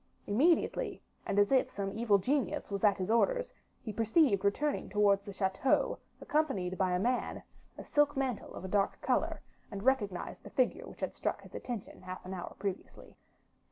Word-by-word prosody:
Immediately, 290 +12 +2 0.3
and 200 - -1
as 205 +3 +4
if 265 -1 +4
some 195 -1 -3
evil 220 -2 +3
genius 215 -1 -1
was 200 0 -3
at 205 -2 +5
his 190 +2 -2
orders, - - +2 0.3
he 215 - -5
perceived 225 - +3
returning 285 +9 0
towards 200 -1 +3
the 200 0 -8
chateau, 190 +6 +1 0.2
accompanied 210 -13 0
by 185 -1 +1
a - - +3
man, 245 +5 -1 0.3
a - - -7
silk 295 -1 +2
mantle 260 -5 -2
of 185 - -7
a - - -3
dark 195 +1 +1
color, - - 0 0.3
and 200 0 -6
recognized 210 -9 0
the - - -11
figure 255 -2 0
which - - -13
had - - -2
struck - - -3
his - - -14
attention 240 -5 -6
half 185 0 -8
an 185 - -5
hour 180 -2 -6
previously. 195 -1 -6
205 Hz, 180 wpm, -32 LUFS, 195-260 Hz, 0.3 s, at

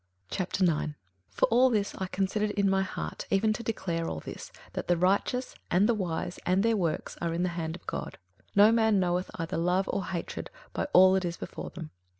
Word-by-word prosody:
21:009:001 175 -5 0 0.3
For - - +2
all 250 +3 +5
this 210 -4 0
I 190 - -4
considered 200 +3 0
in 200 -1 +1
my 195 0 +3
heart 190 - -5
even 215 +2 +3
to 225 - -5
declare 175 -7 -2
all 80 - -4
this, - - -8 0.2
that - - -4
the 175 - +3
righteous, 200 +8 +1 0.2
and 190 +4 +4
the 240 - +3
wise, 175 -3 -3
and 185 +2 +2
their 230 0 +3
works, 170 -6 -2
are 165 -1 -1
in 175 - 0
the 180 - +1
hand 165 -1 -3
of - - -13
God: - - -5 0.4
no 205 +2 +7
man 220 -3 +4
knoweth 180 0 0
either 165 -1 -3
love 180 +3 +1
or 195 - -1
hatred 170 -1 -4 0.2
by - - -1
all 185 -4 +7
that 190 0 +2
is 170 0 -3
before - - -6
them. 165 -3 -8
190 Hz, 205 wpm, -29 LUFS, 175-205 Hz, 0.4 s, no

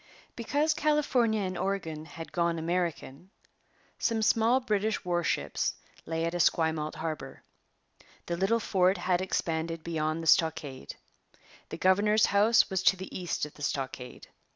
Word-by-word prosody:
Because 290 +6 0
California 275 -8 +1
and 185 -1 -3
Oregon 165 -5 -3
had 165 +1 -9
gone 170 -1 0
American, 170 -1 -3 0.7
some 225 -2 0
small 230 +4 +3
British 215 -4 -1
warships 175 -1 -1 0.3
lay 165 0 -1
at 170 - -2
Esquimalt 160 -2 +1
harbour. 155 -4 -6 0.8
The 170 - -2
little 195 +6 +1
fort 190 -3 +2
had 175 0 0
expanded 165 -3 -2
beyond 160 -1 -2
the - - -6
stockade. 150 - +1 0.7
The - - -6
governor's 210 +3 +4
house 210 +3 +4
was 190 -2 -1
to 190 - +4
the 190 +1 -8
east 175 -4 -2
of 150 - -11
the - - -15
stockade. 135 -3 -4
175 Hz, 135 wpm, -29 LUFS, 160-210 Hz, 0.8 s, governor's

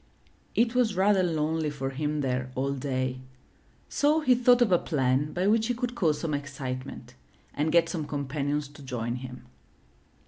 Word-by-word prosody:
It 230 +1 +3
was 240 -5 +2
rather 195 +1 +4
lonely 160 -2 0
for 135 -2 -4
him 150 +2 -2
there 130 -1 -2
all 135 +2 0
day; 130 -1 -2 0.7
so 300 +2 +2
he 260 -4 +4
thought 245 0 +5
of 215 - 0
a 175 - +5
plan 135 -1 0
by 180 +5 -1
which 220 +2 +3
he 245 - 0
could 245 0 -3
cause 165 -10 +1
some 160 -3 -2
excitement 130 -3 -5 0.4
and 150 +2 0
get 170 0 +4
some 160 -3 -4
companions 145 0 -2
to 145 0 -14
join 120 -2 -3
him. 125 0 -9
150 Hz, 170 wpm, -27 LUFS, 135-190 Hz, 0.7 s, thought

